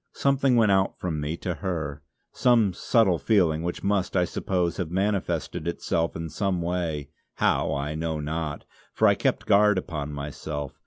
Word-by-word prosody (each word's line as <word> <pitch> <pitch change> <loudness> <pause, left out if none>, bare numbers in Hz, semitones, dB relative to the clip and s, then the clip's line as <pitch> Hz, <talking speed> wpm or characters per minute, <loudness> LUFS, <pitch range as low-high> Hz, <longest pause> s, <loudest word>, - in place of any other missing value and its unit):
Something 140 -2 +2
went 110 -3 +4
out 95 0 +2
from 80 -4 -3
me 75 +3 -3
to 90 - -3
her; 80 -6 -4 0.3
some 115 -6 +3
subtle 95 -2 +2
feeling 80 -2 +2
which 85 +1 -4
must, 100 -1 0
I 90 - +3
suppose, 90 -1 -1
have 90 -5 -2
manifested 90 -5 -1
itself 85 -1 -1
in 80 0 -4
some 95 +1 -1
way, 85 -4 -2 0.2
how - - +1
I 70 +2 -2
know 80 0 -2
not, 75 0 -4 0.3
for - - +4
I - - +6
kept - - -1
guard 105 0 +5
upon 75 -5 -4
myself. 75 0 -5
85 Hz, 165 wpm, -26 LUFS, 75-95 Hz, 0.3 s, I